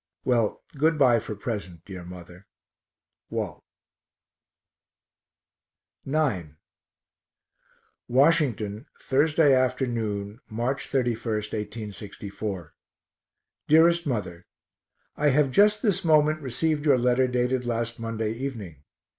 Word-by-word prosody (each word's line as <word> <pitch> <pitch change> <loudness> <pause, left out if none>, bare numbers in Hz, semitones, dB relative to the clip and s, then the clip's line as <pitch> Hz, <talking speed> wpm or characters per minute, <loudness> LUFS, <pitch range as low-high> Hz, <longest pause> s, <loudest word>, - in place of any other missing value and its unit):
Well, 115 -4 +1
good 155 +3 +2
bye 125 -5 +5
for 110 -1 -6
present, 100 -6 -6
dear 95 -3 -8
mother. 90 +1 -12 0.8
WALT. - - -4 2.5
IX 120 - -1 1.5
Washington, 125 -5 +2
Thursday 150 +1 +3
afternoon, 115 -5 -1
March 120 +5 -2
31, 125 -4 0 0.7
1864. 100 -3 -6 0.9
DEAREST 170 +2 +5
MOTHER 95 -9 -4 0.7
I 150 0 +2
have 140 0 +3
just 210 - +4
this 205 -6 +1
moment 155 -1 +3
received 145 +3 -1
your 145 -4 +4
letter 125 +1 +2
dated 125 0 0
last 115 0 -2
Monday 115 -1 -2
evening. 110 - -6
125 Hz, 90 wpm, -26 LUFS, 105-145 Hz, 2.5 s, bye